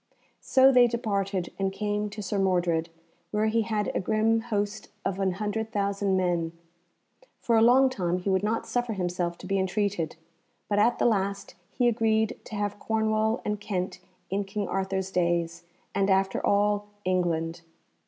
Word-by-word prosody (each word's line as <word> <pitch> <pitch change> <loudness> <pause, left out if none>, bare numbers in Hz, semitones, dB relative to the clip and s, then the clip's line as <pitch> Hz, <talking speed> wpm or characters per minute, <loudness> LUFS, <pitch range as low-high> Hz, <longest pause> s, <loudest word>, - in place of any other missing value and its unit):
So 265 0 +5
they 250 -2 +6
departed, 200 -5 -2
and 195 0 0
came 210 +1 -2
to 210 +1 -7
Sir 200 +1 -2
Mordred, 175 -3 +1 0.4
where 210 +1 0
he 225 +1 +2
had 215 -2 -1
a - - 0
grim 220 +3 +2
host 210 -3 -3 0.2
of 195 0 -1
an 190 -2 +1
hundred 215 +3 -3
thousand 200 -1 0
men. 175 -3 0 0.9
For 230 - +1
a 220 - +5
long 250 +4 +6
time 180 -9 -1
he 180 - -6
would 190 -1 +2
not 215 +2 -1
suffer 245 -2 -1
himself 175 -2 -2
to - - -11
be 195 0 0
entreated, 190 -4 -1 0.5
but 205 0 +1
at 235 +3 +3
the - - +1
last 200 -3 0 0.2
he 245 - +1
agreed 220 -2 +1
to 215 - -7
have 205 0 -2
Cornwall 220 +1 0
and 210 0 -1
Kent 185 -3 -3 0.3
in 200 +1 0
King 200 +1 -3
Arthur's 190 0 -2
days, 170 -1 0 0.3
and 195 0 +1
after 190 0 +2
all 205 0 +2 0.2
England. 170 -2 0
200 Hz, 165 wpm, -27 LUFS, 185-220 Hz, 0.9 s, they